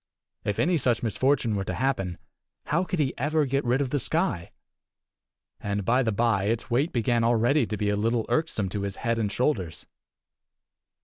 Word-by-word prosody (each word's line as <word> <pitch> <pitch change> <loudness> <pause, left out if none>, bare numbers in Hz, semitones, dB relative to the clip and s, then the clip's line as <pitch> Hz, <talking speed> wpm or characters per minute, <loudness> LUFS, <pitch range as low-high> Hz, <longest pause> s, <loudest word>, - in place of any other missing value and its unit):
If 105 - -2
any 170 -1 +2
such 120 -3 +1
misfortune 120 0 +1
were 100 - -1
to - - -4
happen, 125 -10 -1 0.5
how 170 +4 +1
could 185 0 -3
he 145 -4 +1
ever 150 +3 +1
get 135 +1 0
rid 125 +3 +1
of 130 -3 -2
the 145 - +1
sky? 85 -7 -1 1.1
And, 100 -1 -3
by 125 +3 +3
the 115 -3 +1
by, 110 -2 +1
its 115 +2 -2
weight 140 +8 +2
began 120 0 +1
already 120 +3 +3
to 105 - -3
be 105 +1 0
a 105 - +1
little 115 +2 0
irksome 155 -11 0
to 100 +2 -3
his 100 -1 -3
head 115 0 +1
and 105 -3 -1
shoulders. 95 - -1
120 Hz, 185 wpm, -26 LUFS, 105-135 Hz, 1.1 s, by